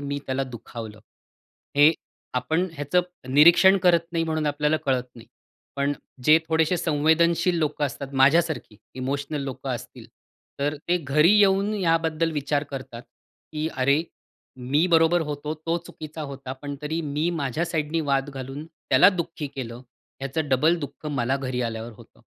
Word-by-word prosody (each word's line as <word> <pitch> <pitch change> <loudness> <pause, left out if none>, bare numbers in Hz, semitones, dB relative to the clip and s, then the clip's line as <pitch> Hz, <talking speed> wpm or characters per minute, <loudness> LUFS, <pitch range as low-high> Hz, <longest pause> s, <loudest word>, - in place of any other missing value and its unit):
मी 140 0 -3
त्याला 130 +1 -1
दुखावलं. 115 -3 -9 0.8
हे 145 +2 +7 0.4
आपण 160 +9 0
ह्याचं 145 +3 +1 0.3
निरीक्षण 175 +6 +7
करत 175 -2 +5
नाही 165 -1 0
म्हणून 155 -1 -1
आपल्याला 150 +1 +1
कळत 130 -2 +2
नाही. 115 - -14 0.5
पण 140 +1 +1 0.3
जे 155 +1 +7
थोडेसे 160 +2 +2
संवेदनशील 165 +3 +2
लोकं 150 -1 0
असतात 140 0 -7
माझ्यासारखी 155 -5 +2 0.2
इमोशनल 140 +3 -3
लोकं 135 -3 -5
असतील, - - -7 0.5
तर 145 +2 0
ते 175 - +3
घरी 150 +4 +3
येऊन 200 +1 +3
याबद्दल 165 -3 +1
विचार 145 -1 -1
करतात, 130 -3 -7 0.5
की 155 +1 -2
अरे, 140 +4 +3 0.5
मी 135 +7 +1
बरोबर 165 +1 +4
होतो, 150 0 -4
तो 165 +2 -2
चुकीचा 155 0 -8
होता, 135 -2 -7
पण 145 +2 -7
तरी 160 +2 -2
मी 150 +1 -1
माझ्या 155 -1 -2
साईडनी 160 -1 -1
वाद 135 +1 +1
घालून 135 +2 -7
त्याला 155 -5 +4
दुःखी 170 -5 -3
केलं. 120 -2 -6 0.4
याचं 140 +3 -2
डबल 155 +6 +3
दुःख 150 0 -8
मला 135 -2 0
घरी 130 -2 -3
आल्यावर 115 0 -4
होतं - - -18
150 Hz, 150 wpm, -24 LUFS, 135-165 Hz, 0.8 s, हे